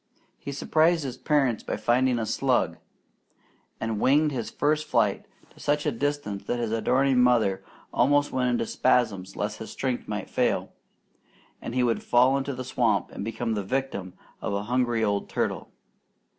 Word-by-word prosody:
He 140 - -6
surprised 160 +3 +2
his 130 -3 -4
parents 135 -4 +1
by - - -4
finding 120 +3 +2
a 115 - -1
slug, - - +1 1.0
and 110 -1 -2
winged 150 +5 +3
his 120 -5 -3
first 150 +1 0
flight - - +1 0.2
to - - -20
such 145 +1 0
a 150 - +2
distance 130 -6 -2
that 120 - -1
his 115 -2 -2
adoring 130 +3 +2
mother 110 -6 +3 0.3
almost 145 0 +3
went 125 -1 +1
into 120 -1 0
spasms 105 -8 +1
lest 105 +1 -3
his 110 - -7
strength 130 -2 -3
might 105 -2 -4
fail, - - 0 0.9
and 120 - -6
he 125 - +2
would 120 -2 +1
fall 125 +2 +4
into 140 0 -2
the 130 - -5
swamp 120 -4 0
and - - -6
become 115 +1 -2
the 105 - -1
victim 100 -5 -3 0.3
of - - -2
a 100 - -2
hungry 120 0 0
old 100 -2 0
turtle. - - -2
125 Hz, 170 wpm, -26 LUFS, 110-135 Hz, 1.0 s, fall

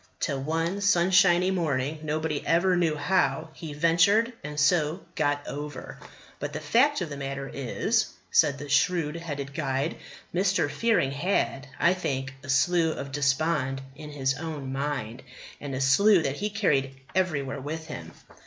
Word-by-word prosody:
Till, 140 -4 -1
one 165 +6 -1
sunshiny 185 -1 +4
morning, 155 -4 -1
nobody 155 -1 -2
ever 180 +2 +3
knew 165 -3 +1
how, 160 -2 +1
he 160 -3 -8
ventured, 175 +9 +3
and 150 0 -5
so 155 +3 +2
got 145 -2 0
over. 145 -1 -7 0.4
But 145 +1 -4
the 155 - -3
fact 240 - +3
of 175 - -3
the 140 - -5
matter 135 0 -4
is," 135 -3 0 0.2
said 140 -1 +4
the 145 +1 -7
shrewd 150 +2 +2
headed 145 -5 -5
guide, 140 0 -1 0.4
"Mr. 185 +2 +1
Fearing 225 -12 +1
had, 140 -4 -1
I 170 - +4
think, 135 -7 -3
a 130 - -11
slough 160 +4 +2
of 140 - -6
despond 140 -1 0
in 150 +1 -9
his 135 -2 0
own 150 -4 -5
mind; 135 -4 -3 0.4
and 140 -2 -5
a - - -3
slough 185 +7 +5
that 135 0 -2
he 210 - -2
carried 135 -11 0
everywhere 145 -7 -1
with 160 +3 -5
him." 155 - -8
150 Hz, 155 wpm, -27 LUFS, 140-175 Hz, 0.4 s, slough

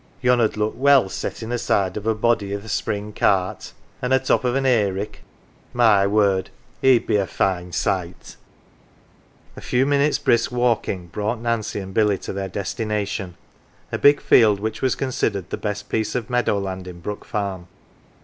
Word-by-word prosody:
" 135 - -33
Yon 125 -1 +4
'ud 110 -1 +1
look 105 0 0
well 135 -6 +4
settin' 110 +4 -5
aside 100 -5 0
of 105 +1 -5
a 110 - +2
body 110 -1 +1
78 100 - -2
NANCY 100 - -5
T 110 - -13
th' - - -5
spring 105 0 -3
cart. 95 -2 0 0.3
An' 125 - -2
a 130 - +6
top 130 0 +1
of 125 0 0
an 135 0 0
""ay 115 -6 +3
rick 100 +2 -5 0.5
my 110 -5 +4
word! 100 -2 +2 0.3
he'd 130 -3 +4
be - - +2
a 100 -2 0
fine 90 -2 -1
sight! - - -3 0.6
" - - -32
A - - -10
few 125 +2 +1
minutes' 145 +1 +2
1 - - -19
brisk 120 +1 +2
walking 120 -7 0
brought 105 +6 -3
Nancy 115 -2 -2
and 95 -1 -8
Billy 105 -2 +2
to - - -7
their 95 0 -4
destination: 105 -2 -3 0.6
a - - -2
big 145 0 +5
field 105 -4 +5
which 110 +1 -4
was 130 - +1
con 135 - -3
sidered 100 -7 -2
the - - -2
best 105 0 -4
piece 110 +1 -2
of 125 -1 -3
meadow 120 -4 +1
land 95 -2 -5
in 90 -1 -9
Brook 105 +4 -6
Farm. 95 -4 -4
105 Hz, 195 wpm, -22 LUFS, 100-120 Hz, 0.6 s, a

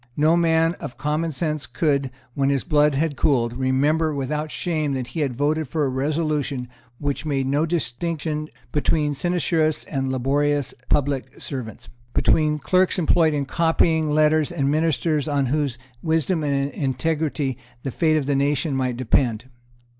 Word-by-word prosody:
No 155 +3 +4
man 165 -1 +3
of 120 - -7
common 150 +4 -1
sense 150 -3 -2
could, 140 +1 0 0.2
when 135 +1 +1
his 140 -2 +1
blood 150 -2 +3
had 150 +1 0
cooled, 120 -4 +1
remember 145 +5 +1
without 150 +3 -2
shame 155 -3 -1
that 130 -2 -3
he 145 - -5
had 135 -5 -1
voted 150 +3 0
for 150 +2 0
a - - 0
resolution 145 -1 -1 0.3
which 145 +1 -2
made 140 -3 -1
no 145 +4 +1
distinction 155 +1 -2 0.2
between 150 0 +1
sinecurists 165 0 0
and 135 -3 -2
laborious 140 +2 0 0.2
public 140 -2 0
servants, 125 -7 -6 0.3
between 155 -1 +3
clerks 185 +6 +2
employed 160 -2 +3
in 140 -1 -1
copying 160 0 +2
letters 155 0 +3
and 140 0 0
ministers 155 -1 +1
on 140 -2 +1
whose 140 -1 -1 0.2
wisdom 160 +1 +1
and 140 -1 0
integrity 145 -1 -1 0.2
the 135 - -3
fate 155 +4 +2
of 145 - -1
the 145 - +1
nation 140 +1 +1
might 130 -2 -1
depend. 125 -1 +1
145 Hz, 155 wpm, -23 LUFS, 135-155 Hz, 0.3 s, No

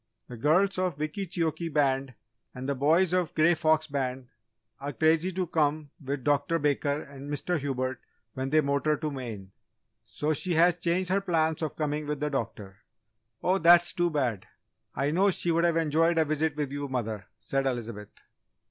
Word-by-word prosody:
The 125 - -7
girls 180 - +2
of 180 -5 -1
Wickeecheokee 165 0 -2
Band 135 -3 +1 0.4
and 130 +1 -6
the 140 - +1
boys 160 +7 +3
of 180 -2 +2
the - - -26
Grey 165 +2 +5
Fox 160 -1 +2
Band 130 -3 -3 0.5
are 140 +1 -5
crazy 160 +5 +2
to 185 +1 -1
come 150 -2 0
with 135 -1 -3
Dr. 145 +3 +1
Baker 145 0 0
and 140 0 -10
Mr. 160 +3 -1
Hubert 130 -2 -2 0.3
when 130 +1 -3
they 155 +2 +4
motor 140 +1 +1
to 155 0 -3
Maine. 110 -8 -7 0.5
So 145 +8 -2
she 175 +4 -1
has 175 +2 +4
changed 180 +2 0
her 195 +1 +2
plans 160 -4 0
of 155 - -3
coming 150 -1 -2
with 150 -1 -2
the 150 0 -2
doctor." 105 -7 -4 0.7
"Oh, 185 +2 +2
that's 175 +1 +6
too 175 0 +1
bad! 130 - -1 0.5
I 140 +2 0
know 190 +5 +3
she 175 -2 0
would 170 +1 +2
have 170 -1 +2
enjoyed 165 +1 +2
a 160 - +4
visit 155 0 0
with 145 -3 -3
you, 145 0 -4
mother," 110 -7 -4
said 135 +5 -1
Elizabeth. 115 -5 -4
150 Hz, 180 wpm, -28 LUFS, 135-165 Hz, 0.7 s, that's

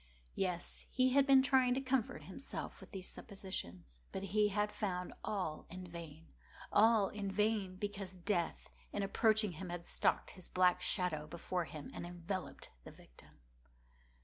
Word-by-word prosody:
Yes, 180 -2 -2
he 255 0 +3
had 275 +1 +5
been 270 -1 +8
trying 260 -2 +4
to - - +1
comfort 260 -3 0
himself - - -6
with - - -11
these 190 -3 -3
suppositions: 90 - -6
but 190 - -4
he 210 +2 +3
had 210 +1 0
found 180 -4 -2
all 185 -8 -2
in 185 +2 -7
vain. 165 -2 -9 0.4
All 215 -1 +6
in 205 -2 -3
vain; 210 -2 +1
because 195 -1 -4
Death, 180 -2 -1 0.2
in 205 - -1
approaching 215 +1 +3
him 180 +2 -6
had 175 0 -5
stalked - - +1
with - - -13
his 185 - -8
black 180 -1 +4
shadow 175 -6 +1
before 170 +2 -2
him, 150 -2 -8
and 175 - -5
enveloped 175 +2 -5
the - - -9
victim. - - -18
190 Hz, 160 wpm, -36 LUFS, 175-210 Hz, 0.4 s, been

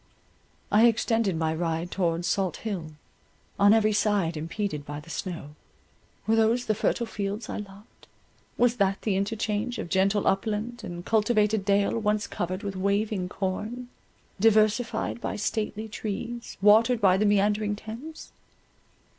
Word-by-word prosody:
I 215 +3 +6
extended 225 -4 +1
my 160 -1 0
ride 165 +1 -2
towards 170 -2 0
Salt 190 -3 0
Hill, 175 -8 -4 0.7
on 200 0 +6
every 215 -1 +4
side 205 -5 +1
impeded 160 0 -3
by 145 0 -6
the 150 +2 -12
snow. 165 -3 -5 0.7
Were 220 - +3
those 225 +2 +2
the 215 - +1
fertile 235 +3 0
fields 210 0 -4
I - - -3
loved—was 210 +4 -5
that 195 -1 +1
the 205 -3 +1
interchange 215 +3 -1
of - - -5
gentle 195 +2 +2
upland 220 +4 -1
and 175 -3 -7
cultivated 215 -1 +2
dale, 200 +2 +2
once 210 -1 0
covered 185 +3 -4
with 200 -1 -4
waving 200 0 0
corn, 215 +7 -4 0.5
diversified 220 +2 +2
by - - -3
stately 215 0 -2
trees, 230 +3 -5
watered 225 +3 +5
by 190 -3 +5
the 205 +3 +1
meandering 205 +1 +2
Thames? 230 +10 -9
205 Hz, 140 wpm, -27 LUFS, 190-220 Hz, 0.7 s, I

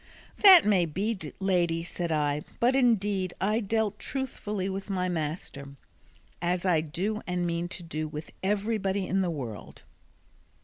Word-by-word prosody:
"That 380 -5 +9
may 195 -4 +4
be, 200 +8 -1 0.2
lady," 175 -4 +1
said 170 0 -2
I; 150 -1 0 0.2
"but 245 +2 +3
indeed 205 -7 +2
I 210 +3 +1
dealt 215 -1 -1
truthfully 210 -7 -3
with 195 +1 -5
my 185 -2 0
master, 150 -4 -4 0.7
as 175 +1 0
I 170 -4 +3
do 190 +8 -3
and 180 -1 -1
mean 170 0 -1
to 175 - -7
do 155 -2 -4
with 150 0 -7
everybody 200 -1 0
in 195 +1 +1
the 180 - 0
world." 125 -10 -7
185 Hz, 145 wpm, -28 LUFS, 165-210 Hz, 0.7 s, That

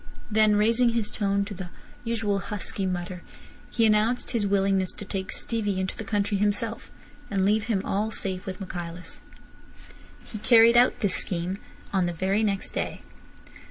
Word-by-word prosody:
Then 215 -1 +4
raising 230 +4 +4
his 230 -3 -1
tone 200 -1 0
to 205 - -6
the 185 -2 -7 0.3
usual 225 -4 0
husky 200 -1 -1
mutter, 180 0 -4 0.5
he 230 - +2
announced 220 +3 +2
his 220 -4 0
willingness 195 -1 +2
to 205 - -9
take 190 0 -4
Stevie 205 -5 -1
into 190 0 -2
the - - -6
country 205 0 0
himself, 210 +3 -1 0.4
and 195 -2 +1
leave 210 +2 +2
him 210 -5 0
all 210 +3 0
safe 190 -4 -4
with 185 0 -5
Michaelis. 175 -2 -6 1.0
He 215 - -8
carried 230 +1 +6
out 245 +1 +4
this 200 -4 +3
scheme 180 +2 -1 0.3
on 185 -2 +2
the 175 - -2
very 190 +5 0
next 200 -3 -1
day. - - -4
200 Hz, 160 wpm, -26 LUFS, 190-220 Hz, 1.0 s, carried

